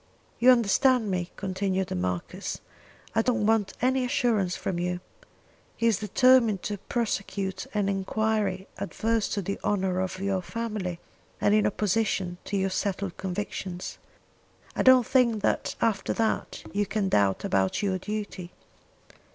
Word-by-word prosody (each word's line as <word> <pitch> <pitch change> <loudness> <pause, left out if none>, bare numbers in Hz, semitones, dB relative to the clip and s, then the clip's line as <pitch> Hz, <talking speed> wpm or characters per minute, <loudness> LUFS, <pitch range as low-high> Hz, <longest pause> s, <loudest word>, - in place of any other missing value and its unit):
"You 245 +2 +6
understand 245 -1 +4
me," 180 -1 -1
continued 190 -1 -1
the - - -3
Marquis, 90 -1 -3 0.6
"I 225 - +3
don't 235 -3 +1
want 220 -2 +2
any 260 +1 +3
assurance 225 -7 +1
from 175 -2 -3
you. 180 0 -1 0.8
He 230 - -1
is 225 -4 +3
determined 230 -1 +4
to 205 -2 -3
prosecute 195 -4 -2
an 205 -2 +1
enquiry 200 0 0
adverse 220 +2 -1
to 200 - -2
the 200 +3 -3
honour 190 -2 0
of 185 0 -2
your 195 -1 0
family, 210 -4 -4 0.4
and 205 - +3
in 215 0 +4
opposition 195 -3 0
to 200 - -2
your 190 0 0
settled 195 -1 -2
convictions. 185 -1 -4 0.8
I - - 0
don't 260 -2 +7
think 235 -5 +2
that - - 0
after 225 -3 +1
that 225 -1 -1
you 205 0 0
can 210 -3 0
doubt 100 - +2
about 95 - +1
your 190 -2 0
duty. 205 -3 -5
200 Hz, 145 wpm, -27 LUFS, 185-225 Hz, 0.8 s, don't